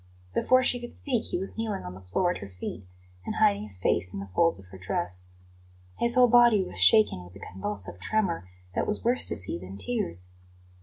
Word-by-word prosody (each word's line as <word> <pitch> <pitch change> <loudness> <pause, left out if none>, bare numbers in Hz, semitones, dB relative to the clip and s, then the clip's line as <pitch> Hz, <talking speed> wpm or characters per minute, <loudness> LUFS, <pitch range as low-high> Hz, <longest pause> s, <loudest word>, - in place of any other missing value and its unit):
Before 255 - +3
she 245 0 +2
could 240 0 -7
speak 250 -6 -1
he - - -2
was 195 +4 -3
kneeling 215 -3 -2
on 90 - -7
the 95 - -11
floor 175 - 0
at - - -5
her 100 - -8
feet 95 +2 -7 0.4
and - - -4
hiding 100 0 +3
his 105 -3 0
face 90 0 0
in 100 - -6
the 100 0 -7
folds 165 -1 +3
of 95 - -14
her 95 0 -12
dress. 90 0 -3 0.7
His 235 0 +4
whole 250 -1 +7
body 235 -4 +6
was - - -9
shaken 215 - +5
with 90 +1 -15
a - - -11
convulsive 95 -2 -4
tremor 170 - -1 0.2
that - - -1
was 210 - -2
worse 245 +2 +2
to - - -1
see 90 -3 -1
than 95 +2 -9
tears. 90 -4 -2
100 Hz, 215 wpm, -27 LUFS, -, 0.7 s, whole